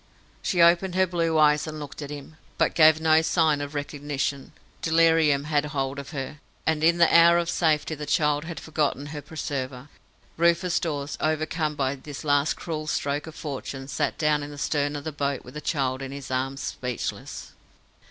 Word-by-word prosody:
She 175 -3 +3
opened 175 +2 +4
her 190 0 +4
blue 165 -3 0
eyes 150 0 +4
and 155 0 -6
looked 145 0 -8
at 145 - -6
him, 145 +1 -9 0.2
but - - +2
gave 155 -1 +6
no 160 0 +4
sign 160 -3 +2
of 145 +1 -6
recognition. 145 -1 -3 0.3
Delirium 160 -3 +3
had 150 -1 +1
hold 140 -2 -3
of 140 - -8
her, 145 -1 -6 0.3
and 160 -1 +1
in 170 +1 +5
the 170 -1 +4
hour 170 0 +7
of 170 0 0
safety 155 -2 +1
the 150 -1 -6
child 150 0 +1
had 170 0 -6
forgotten 150 -3 -1
her 150 - -5
preserver. 140 -3 -5 0.5
Rufus 170 +1 +2
Dawes, 145 -3 -3
overcome 155 0 -1
by 135 -1 0
this 140 +2 -9
last 145 0 +2
cruel 155 -2 -5
stroke 145 0 -1
of 160 - -9
fortune, 135 -2 -6
sat 140 - -1
down 150 -1 +2
in 145 - -6
the 145 - -9
stern 145 0 0
of 145 - -5
the 155 - -4
boat, 140 -2 -2
with 125 - -11
the 150 - -6
child 135 -4 -1
in 135 0 -5
his 140 -2 -8
arms, 135 +1 -2
speechless. 125 -2 -5
150 Hz, 190 wpm, -25 LUFS, 140-160 Hz, 0.5 s, hour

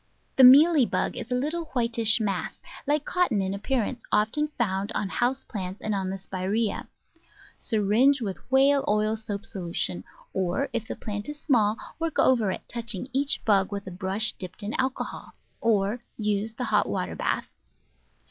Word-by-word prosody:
The 265 - +6
Mealy 285 +1 +8
Bug - - -1
is - - -5
a 250 - 0
little 310 +6 -1
whitish 230 -2 +4
mass, 200 -4 -2 0.3
like 295 0 +1
cotton 355 - +1
in 190 0 -1
appearance, 240 +3 -2
often 220 +9 +2
found 195 -3 -1
on 200 - -1
house 250 +6 0
plants 190 -2 -5
and 215 - -2
on 190 -2 -1
the 195 - -3
Spiraeas. 195 +3 -2 0.7
Syringe 225 +6 +3
with 200 -6 -4
whale 275 +1 +4
oil 215 +1 +2
soap 215 -1 -5
solution; 170 - -3 0.3
or, 190 +9 -1
if 230 -2 -2
the - - -4
plant 205 +3 -5
is 295 0 -7
small, 225 -8 +2 0.2
work 330 -1 -2
over 235 -6 +4
it, - - -7
touching 235 -1 -2
each 280 +2 0
bug 195 -3 +3
with 200 0 -4
a 190 - -7
brush 190 +4 0
dipped 185 +1 -6
in 210 +2 -3
alcohol; 260 0 -3 0.3
or 220 +1 +1
use 210 0 -1
the 250 - -4
hot 210 -4 +1
water 185 -2 -2
bath. - - -2
220 Hz, 165 wpm, -26 LUFS, 200-255 Hz, 0.7 s, Mealy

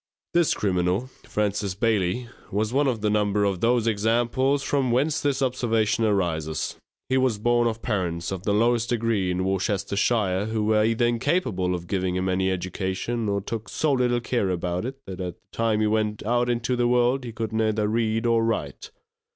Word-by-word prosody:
This 170 -2 +3
criminal, 95 +5 0 0.2
Francis 105 -2 -1
Bailey, 110 +1 0 0.2
was 105 +3 -1
one 140 +1 +3
of 120 -5 -1
the 105 - +1
number 105 -1 +1
of 100 -3 0
those 120 -1 +2
examples 120 +5 +1
from 135 -3 0
whence 145 +6 +1
this 140 -1 0
observation 115 -3 +1
arises. 80 -7 -1 0.3
He 130 - +1
was 130 -5 +1
born 120 +2 +2
of 115 0 -3
parents 90 -7 -2
of 95 -2 -4
the 105 - -1
lowest 115 +2 +2
degree, 115 -5 0
in 90 +1 -1
Worcestershire, 100 +1 0
who 110 -1 -1
were 105 0 +3
either 115 +2 +2
incapable 120 - 0
of 85 -1 -6
giving 90 -1 -1
him 95 +1 0
any 95 +1 +1
education, 95 +5 -2
or 100 0 0
took 110 +2 -5
so 155 - 0
little 125 -2 +1
care 115 -6 0
about 90 +1 -2
it 135 +2 -5
that 95 -1 -7
at 90 -1 -4
the - - -22
time 110 -2 +1
he - - +3
went 105 -1 0
out 120 +2 +1
into 120 +1 0
the 120 0 +2
world 125 +2 +2
he 120 - -6
could 110 0 -4
neither 110 -1 +1
read 110 +1 0
or 115 -1 +3
write. 115 - -2
110 Hz, 185 wpm, -25 LUFS, 95-120 Hz, 0.3 s, This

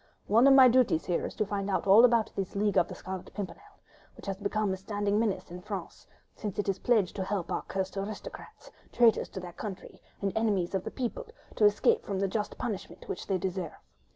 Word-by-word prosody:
One 230 +6 +5
of 275 - +8
my 260 -1 +9
duties 245 -9 +3
here 175 - 0
is - - -10
to 215 - 0
find 200 0 -3
out 195 - 0
all 200 +4 +8
about 235 -3 +4
this 195 -1 -4
League 205 0 +1
of 170 - +2
the - - -8
Scarlet 185 -1 -7
Pimpernel, 210 - -7 0.4
which - - -12
has 195 -1 -2
become 205 0 -1
a - - -4
standing 205 +1 -1
menace 220 -4 0
to 175 +1 -10
France, 195 -3 -7 0.3
since 205 -4 -5
it 205 - -1
is 195 -1 0
pledged 215 -7 +2
to 190 - -1
help 190 -2 -3
our - - -1
cursed 190 0 -4
aristocrats—traitors 215 +2 -1
to - - -7
their 180 -1 -8
country, 195 -1 -8 0.2
and 195 -2 -2
enemies 205 -6 +1
of 190 -1 -1
the - - -2
people—to 450 - -3
escape 205 0 +3
from 200 - -3
the 195 - +1
just 210 +2 -3
punishment 215 -6 -5
which - - -5
they 195 - +1
deserve. 180 -2 -3
200 Hz, 210 wpm, -29 LUFS, 190-220 Hz, 0.4 s, my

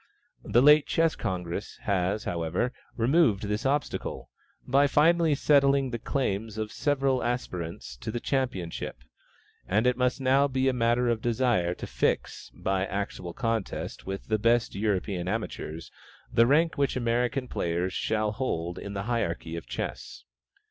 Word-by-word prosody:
The 120 +5 +3
late 150 +1 +7
Chess 165 -1 +2
Congress 90 -2 -4
has, 100 +2 0
however, 85 +8 -1 0.2
removed 120 - +3
this 105 +5 -1
obstacle, 145 +1 -2 0.4
by 140 +3 +4
finally 160 +2 +4
settling 140 -2 +3
the 120 - -3
claims 110 -5 -2
of 110 -1 -2
the - - -13
several 135 -3 +1
aspirants 90 - -4
to - - -6
the 120 - -2
championship; 95 - -3 0.6
and 110 +5 +2
it 125 0 +3
must 125 +2 +1
now 135 +2 +4
be 130 -1 0
a 130 - +3
matter 120 0 +2
of 120 -2 +1
general 120 - -1
desire 110 -9 +2
to - - -6
fix, - - -1
by 95 0 -1
actual 95 -3 -4
contest 115 -5 -3
with 95 0 -4
the 110 -1 0
best 115 +2 +2
European 100 -3 -1
amateurs, 90 -6 -4 0.4
the 115 0 +5
rank 160 +3 +3
which 140 - +1
American 125 +2 0
players 85 0 -1
shall 110 +1 0
hold 90 -8 -3
in 100 0 -7
the 100 - -2
hierarchy 85 -8 -2
of 85 - -7
chess. - - -5
115 Hz, 155 wpm, -28 LUFS, 95-130 Hz, 0.6 s, late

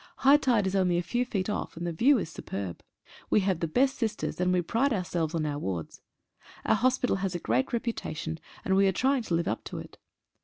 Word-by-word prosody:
High 280 +2 +8
tide 245 -8 +2
is 190 +1 -1
only 180 -2 +2
a 175 - 0
few 240 +8 0
feet 195 -5 -1
off, 210 - -3
and 170 - -4
the 170 - -1
view 260 - +4
is 195 - -2
superb. 95 - -6 0.5
We 210 - +4
have 190 -3 0
the 165 - -1
best 265 - +2
sisters, 220 -5 -2
and 180 0 +2
we 180 -1 +2
pride 245 +11 +1
ourselves 175 -4 -1
on 160 -2 0
our 145 -1 -2
wards. 90 - -4 0.6
Our - - +4
hospital 250 -1 +2
has 190 -2 -2
a - - -1
great 125 -2 0
reputation, 165 -9 -3 0.3
and 190 - +2
we 195 0 +5
are - - +4
trying 265 +6 +2
to 180 -7 -1
live 170 +2 0
up - - -2
to - - -6
it. - - -10
190 Hz, 230 wpm, -28 LUFS, 165-235 Hz, 0.6 s, High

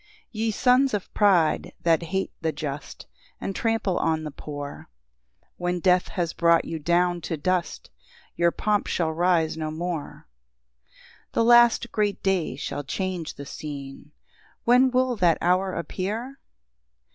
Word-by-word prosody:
1 420 - -30 0.2
Ye 225 0 -1
sons 250 +3 +3
of 200 - -6
pride, 185 -7 +3
that 165 -1 +3
hate 190 +3 -2
the 160 0 0
just, 145 -1 -6 0.3
And 195 - -4
trample 225 -5 0
on 160 -1 0
the 150 - -5
poor, 145 0 -8 0.7
When 180 0 -1
death 180 0 +3
has 170 -2 -2
brought 170 -1 +3
you 165 - -4
down 175 +2 +1
to 165 - -3
dust, 180 - -2 0.4
Your 170 0 +3
pomp 210 +4 0
shall 165 -2 0
rise 165 -1 +1
no 155 -1 -3
more, 165 0 -5 0.6
2 65 - -41 0.4
The - - +2
last 240 0 +5
great 210 -2 -1
day 185 -8 0
shall 145 +1 -4
change 180 +3 -4
the 140 - -8
scene; 140 0 -8 0.5
When 250 +2 +5
will 255 0 +1
that 175 -4 +3
hour 185 +2 +1
appear? 220 +10 -4
175 Hz, 145 wpm, -25 LUFS, 160-205 Hz, 0.7 s, last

